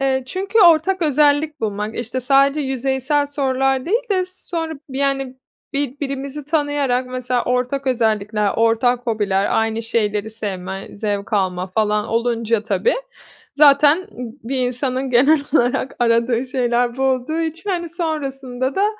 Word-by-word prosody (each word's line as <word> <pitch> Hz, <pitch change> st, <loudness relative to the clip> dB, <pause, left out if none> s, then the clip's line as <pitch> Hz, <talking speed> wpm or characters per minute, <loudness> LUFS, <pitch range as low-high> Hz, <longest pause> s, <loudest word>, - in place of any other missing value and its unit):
Eee, 265 Hz, -1 st, +1 dB
çünkü 390 Hz, -, -1 dB
ortak 350 Hz, +1 st, +5 dB
özellik 300 Hz, 0 st, +2 dB
bulmak. 210 Hz, 0 st, -3 dB
İşte, 240 Hz, +2 st, -3 dB
sadece 275 Hz, +3 st, +3 dB
yüzeysel 265 Hz, +2 st, 0 dB
sorular 270 Hz, -2 st, 0 dB
değil 455 Hz, +8 st, +1 dB
de 370 Hz, -2 st, +2 dB
sonra 335 Hz, -3 st, -5 dB
bi 265 Hz, 0 st, -5 dB
yani, 270 Hz, -2 st, -1 dB, 0.4 s
birbirimizi 280 Hz, +1 st, -3 dB
tanıyarak 290 Hz, -4 st, 0 dB
mesela 250 Hz, -1 st, -2 dB
ortak 250 Hz, +2 st, -1 dB
özellikler, 215 Hz, -4 st, +1 dB
ortak 240 Hz, +2 st, +2 dB
hobiler, 205 Hz, -3 st, +1 dB
aynı 225 Hz, 0 st, -1 dB
şeyleri 215 Hz, -2 st, -1 dB
sevme, 195 Hz, -3 st, -5 dB
zevk 205 Hz, -1 st, -3 dB
alma 185 Hz, -3 st, 0 dB
falan 210 Hz, +2 st, 0 dB
olunca 230 Hz, -1 st, 0 dB
tabii 200 Hz, -3 st, +1 dB, 0.6 s
zaten 295 Hz, +4 st, +5 dB, 0.4 s
bir 265 Hz, +3 st, -3 dB
insanın 255 Hz, +1 st, -2 dB
genel 275 Hz, +6 st, +5 dB
olarak 255 Hz, -1 st, +1 dB
aradığı 235 Hz, +1 st, +2 dB
şeyler 245 Hz, -1 st, 0 dB
bu 265 Hz, -, -1 dB
olduğu 265 Hz, +4 st, 0 dB
için, 330 Hz, +5 st, -4 dB
hani, 345 Hz, -3 st, -2 dB
sonrasında 270 Hz, -6 st, -3 dB
da 395 Hz, -, +3 dB
260 Hz, 135 wpm, -20 LUFS, 230-290 Hz, 0.6 s, ortak